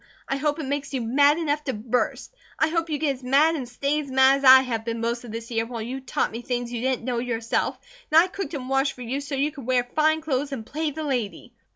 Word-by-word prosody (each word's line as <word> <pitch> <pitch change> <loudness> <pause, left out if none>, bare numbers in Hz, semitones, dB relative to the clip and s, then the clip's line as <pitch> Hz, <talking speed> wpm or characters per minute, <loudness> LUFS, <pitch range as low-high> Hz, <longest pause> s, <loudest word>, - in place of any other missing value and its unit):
I 275 - -1
hope 295 +1 0
it 315 - -4
makes 280 0 -3
you 255 - -1
mad 285 +6 +4
enough 300 -2 -1
to 265 - -1
burst. 235 - -2 0.2
I 315 - +2
hope 330 0 -1
you 300 - -1
get 290 -2 0
as - - -20
mad 285 +6 +4
and 255 -6 -5
stay 280 +4 -1
as 280 - -9
mad 265 +1 +5
as - - -10
I 260 0 +9
have 235 -4 -3
been 230 0 -3
most 235 +1 -2
of 230 - -8
this 230 +1 -7
year 225 0 0
while 235 -1 -6
you 255 +4 -5
taught 260 - -1
me 230 - -6
things 245 -1 -3
you 235 - -3
didn't 255 -2 -1
know 245 -2 -1
yourself; 235 -2 -1 0.3
and 315 - +8
I 340 - +6
cooked 390 -3 -5
and 255 -3 -5
washed 270 +1 +1
for 250 - -9
you 260 +4 -3
so 280 0 -4
you 285 +3 0
could 275 -5 -10
wear 255 -1 +3
fine 310 +5 +1
clothes 285 -2 -2
and 225 -5 -5
play 310 +4 -2
the 310 +2 -5
lady. 245 -3 -3
265 Hz, 270 wpm, -24 LUFS, 245-295 Hz, 0.3 s, I